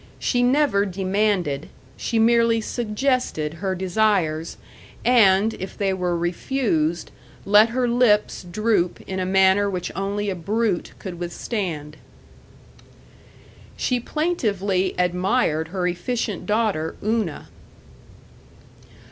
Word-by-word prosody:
She 245 - 0
never 245 -5 +3
demanded; 190 -5 -1 0.3
she 230 - -2
merely 230 0 +4
suggested 220 - -1
her 190 -2 -1
desires, 180 -4 0 0.5
and, 220 -3 +5
if 190 0 -8
they 195 -2 0
were 180 -2 -1
refused, 175 - -1 0.3
let 210 +3 +6
her 250 +1 0
lips 235 -3 +2
droop 180 0 0
in 190 0 -4
a 185 - -1
manner 190 +1 +4
which 180 -2 -4
only 200 +1 -2
a - - -3
brute 205 +1 -1
could 180 -3 -8
withstand. 170 -4 -4 1.8
She 250 -1 0
plaintively 205 - -1
admired 180 -2 +1
her 180 +1 -3
efficient 180 +7 -2
daughter 210 -7 0
Una. 215 -7 -2
195 Hz, 105 wpm, -23 LUFS, 180-225 Hz, 1.8 s, let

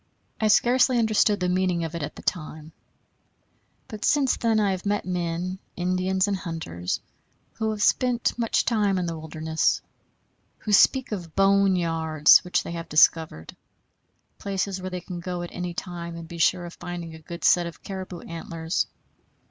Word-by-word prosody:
I 220 - +2
scarcely 245 +4 +4
understood 215 -2 +3
the 180 - 0
meaning 180 -1 +1
of 165 0 -4
it 170 - -4
at 150 - -5
the - - -11
time; 155 -2 -4 1.2
but 215 -1 -8
since 280 -3 +3
then 225 -2 +1
I 205 -2 +2
have 185 -1 -3
met 205 0 -1
men, 180 +1 -3 0.2
Indians 185 +2 0
and 200 - 0
hunters, 160 - -4 0.6
who 220 -1 0
have 215 -2 -1
spent 245 -2 +2
much 230 -2 +1
time 210 -4 +2
in 180 - -1
the 165 -1 -3
wilderness, 160 0 -1 0.8
who 210 - -5
speak 260 +6 +5
of 175 -6 -6
"bone 195 0 +4
yards" 160 -3 +4
which 180 0 0
they - - -6
have 170 -1 -6
discovered, 155 - +3 0.8
places 195 -1 -2
where 185 - -4
they 180 -1 -5
can 175 0 -7
go 175 0 -4
at 175 - -7
any 180 -1 -4
time 170 -2 -6
and 165 -1 -8
be 170 0 -9
sure 175 +2 +2
of 170 - -9
finding 175 -2 -7
a 160 - -10
good 170 +2 -9
set 175 -1 +4
of 170 - -11
caribou 185 -3 -6
antlers. 165 0 -3
180 Hz, 170 wpm, -25 LUFS, 165-200 Hz, 1.2 s, speak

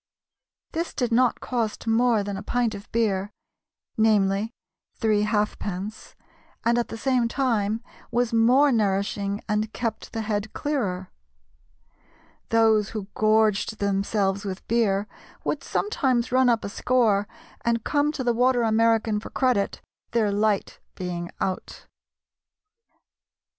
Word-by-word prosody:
This 335 +1 -3
did 245 -3 -1
not 245 +1 +3
cost 230 -4 -2
more 225 -1 +3
than 200 0 -4
a 195 - -5
pint 235 +1 0
of 200 +1 -10
beer 205 -4 0 0.7
"namely, 210 -1 +2 0.4
three 215 -2 +2
halfpence" 210 -1 -2 0.5
and 235 +1 +3
at 240 - -1
the 225 - -7
same 250 -1 +1
time 230 -4 0 0.3
was 240 0 0
more 250 +6 +5
nourishing 200 -2 0
and 210 0 0
kept 230 -3 -4
the 225 - -3
head 210 0 -2
clearer. 195 -11 -2 1.4
Those 220 -2 +4
who 200 -1 -6
gorged 215 0 +2
themselves 200 0 0
with 190 -2 -6
beer 210 -3 +1 0.4
would - - -2
sometimes 260 - 0
run 255 0 +4
up 230 -2 +1
a - - -3
score 215 -3 +2 0.4
and 235 -1 +1
come 290 0 +1
to 260 - -3
the 240 -1 +2
Water 245 +1 +3
American 225 -1 +2
for - - -9
credit, 250 -7 0 0.3
"their 220 -3 +2
light 205 0 0 0.2
being 175 -1 -4
out." 185 -1 -4
220 Hz, 125 wpm, -25 LUFS, 200-235 Hz, 1.4 s, more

